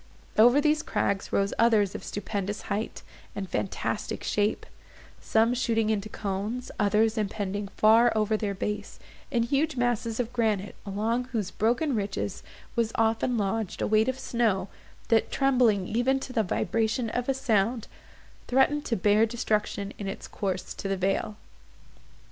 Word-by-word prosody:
Over 240 +6 +6
these 305 +1 +2
crags 200 0 -1
rose 200 0 +1
others 215 -4 +4
of - - -6
stupendous 205 0 -4
height, 215 +3 -4 0.3
and 195 -1 -4
fantastic 190 - -3
shape; 210 +1 0 0.5
some 225 +2 +2
shooting 225 -3 +1
into 215 0 -2
cones; 210 +5 -4
others 215 +2 +2
impending 205 -1 -2
far 225 +2 +6
over 215 0 +2
their 210 -2 -2
base, 210 +2 -4 0.3
in 240 -5 +1
huge 280 +5 0
masses 240 -2 0
of 245 0 -2
granite, 215 -5 0
along 225 +5 -1
whose 225 -6 -3
broken 245 +7 +1
ridges 200 -2 -2 0.3
was 230 -1 +1
often 225 +2 +1
lodged 210 0 -2
a - - 0
weight 220 +3 +3
of 260 - -2
snow, 220 -7 0 0.4
that, 225 -1 +3
trembling 245 -8 +3
even 250 +4 +1
to 255 - -7
the 230 - +3
vibration 220 +4 0
of 245 +1 -2
a 270 - +2
sound, 230 -3 +1 0.6
threatened 280 +3 +3
to 230 - 0
bear 210 +3 +3
destruction 215 -3 -1
in 200 - -4
its 195 - -6
course 190 -3 -3
to - - -5
the 195 0 -1
vale. 195 +3 -1
220 Hz, 150 wpm, -27 LUFS, 205-240 Hz, 0.6 s, Over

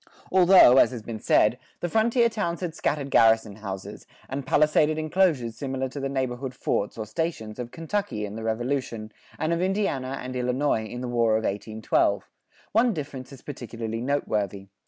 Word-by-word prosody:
Although, 180 -8 +7
as - - +6
has 120 -4 -7
been 110 -1 -6
said, 110 +3 +3 0.2
the 175 - -2
frontier 230 +5 +3
towns 205 -7 -3
had 175 -3 -3
scattered 145 -3 -2
garrison 110 -2 +4
houses, 100 0 -7 0.2
and 135 0 -5
palisaded 155 +1 +3
enclosures 155 -8 +1
similar 135 -2 -3
to 140 - -7
the 135 0 -2
neighborhood 130 -1 -3
forts, 105 -4 -1
or 110 - -4
stations, 110 -2 -4
of 120 -1 -4
Kentucky 165 - -3
in 100 - -7
the 115 - -6
Revolution, 115 -1 -2 0.3
and 160 +2 0
of 170 - -1
Indiana 180 -9 -1
and 130 0 -6
Illinois 125 -1 0
in 120 +3 -7
the 125 - -3
War 115 -2 +2
of 110 +1 +1
1812, 110 +2 0 0.5
one 230 0 +3
difference 140 -4 -6
is 135 - -13
particularly 115 -4 -5
noteworthy. 105 -8 -2
130 Hz, 170 wpm, -26 LUFS, 110-155 Hz, 0.5 s, Although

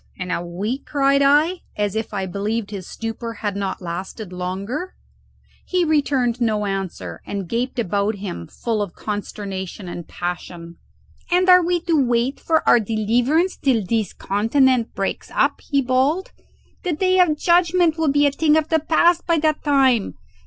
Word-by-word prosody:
in 185 -1 -5
a 175 - -1
week?" 200 +10 -4
cried 275 -1 +2
I, 300 +6 +3 0.2
as 205 -1 -1
if 220 0 -3
I 195 -2 -2
believed 205 +3 -3
his 195 -3 -6
stupor 230 0 -5
had 205 -1 -1
not 195 -2 -3
lasted 180 +3 -6
longer. 195 - -4 0.7
He 365 -2 0
returned 275 -6 +1
no 215 -3 +1
answer 185 - -4
and 195 -3 -5
gaped 245 +6 -2
about 205 -1 0
him 190 - -6
full 225 -3 -3
of 200 -4 -4
consternation 200 -2 -5
and 175 -1 -7
passion. 175 -1 -6 0.5
"And 360 +1 +3
are 365 0 +8
we 350 0 0
to 325 -5 +2
wait 240 +2 0
for 320 -1 0
our 240 - +7
deliverance 235 - +1
till 240 -7 +1
this 220 -1 -1
continent 235 +4 +1
breaks 195 - -3
up?" - - +2
he 280 -2 0
bawled. 265 +9 +1 0.5
"The 360 -3 -1
day 370 +4 +2
of 325 -4 +4
judgment 345 0 +3
will 315 -3 +2
be 290 +1 +3
a 285 - +3
thing 305 +2 +3
of 315 0 0
the 320 - +3
past 335 +3 +2
by 335 -1 +3
that 310 -1 0
time. 265 -7 +2
235 Hz, 165 wpm, -21 LUFS, 200-305 Hz, 0.7 s, are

